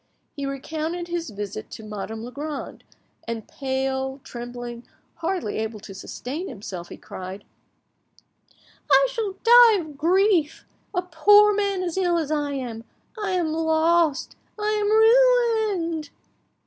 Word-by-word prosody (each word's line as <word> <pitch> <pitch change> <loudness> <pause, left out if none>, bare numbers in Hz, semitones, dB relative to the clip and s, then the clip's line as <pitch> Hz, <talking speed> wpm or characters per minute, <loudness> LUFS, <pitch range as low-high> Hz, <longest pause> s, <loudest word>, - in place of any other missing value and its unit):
He 280 -2 -3
recounted 315 +5 -4
his 340 -3 -3
visit 200 - -6
to 220 - -9
Madame 215 +1 -6
Legrand, 285 +4 -6 0.4
and 230 -2 -4
pale, 265 0 -2
trembling, 240 0 -7 0.3
hardly 340 - -2
able 220 0 -3
to 200 -1 -10
sustain 270 - -6
himself, 190 -6 -7
he - - -9
cried— 185 +2 -8 1.5
"I - - +6
shall 440 -5 -2
die 475 -1 +8
of 305 -5 -9
grief! 345 -1 +2 0.3
A 360 - +1
poor 410 +5 +6
man 400 -2 0
as 350 0 -3
ill 350 -2 +2
as 310 -3 -2
I 290 -2 -1
am! 240 -4 -5 0.3
I 410 -4 -2
am 340 -4 0
lost! 320 -1 +2 0.2
I 420 0 0
am 410 - +1 0.9
ruined!" 330 -3 -3
310 Hz, 130 wpm, -24 LUFS, 245-355 Hz, 1.5 s, die